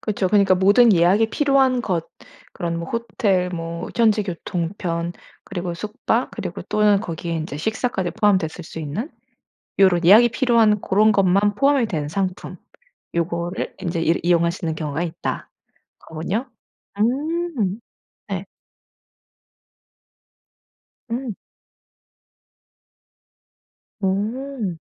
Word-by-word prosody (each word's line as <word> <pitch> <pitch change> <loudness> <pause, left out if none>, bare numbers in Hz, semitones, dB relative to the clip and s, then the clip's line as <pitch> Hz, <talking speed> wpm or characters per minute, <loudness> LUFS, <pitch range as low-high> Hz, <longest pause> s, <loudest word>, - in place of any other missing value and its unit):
그쵸. 205 -3 -1
그러니까 200 -2 +4
'모든 205 +5 +5
예약이 190 +5 +4
필요한 270 -3 +2
것 170 -6 -2 0.4
그런 170 -1 -3
뭐 170 - -6
호텔 210 -6 0
뭐 165 -1 -5
현지 220 -2 +3
교통편 170 -2 -3 0.3
그리고 175 -2 -4
숙박 210 +5 -2
그리고 - - -6
또는 210 -2 +3
거기에 170 -4 -5
인제 155 -2 -4
식사까지 215 - -2
포함됐을 185 -5 +1
수 165 - -9
있는 160 - -4 0.7
요런 180 -3 +4
예약이 220 +7 +7
필요한 230 -4 +3
고런 215 +3 +3
것만 200 +1 +3
포함이 275 -3 +3
된 155 -7 -3
상품. 185 +3 -3 0.6
요거를 170 +1 -2
인제 170 -3 -2
이 165 +1 +2
이용할 170 -1 +3
수 175 0 -7
있는 160 -1 -1
경우가 155 +1 -3
있다.' 165 -2 -4 0.5
거군요. 185 +11 -4 0.5
음 265 - 0 0.5
네. 190 -1 -3 2.7
음. 240 -3 -3 2.6
오. 210 +1 -2
195 Hz, 225 characters per minute, -22 LUFS, 170-220 Hz, 2.7 s, 예약이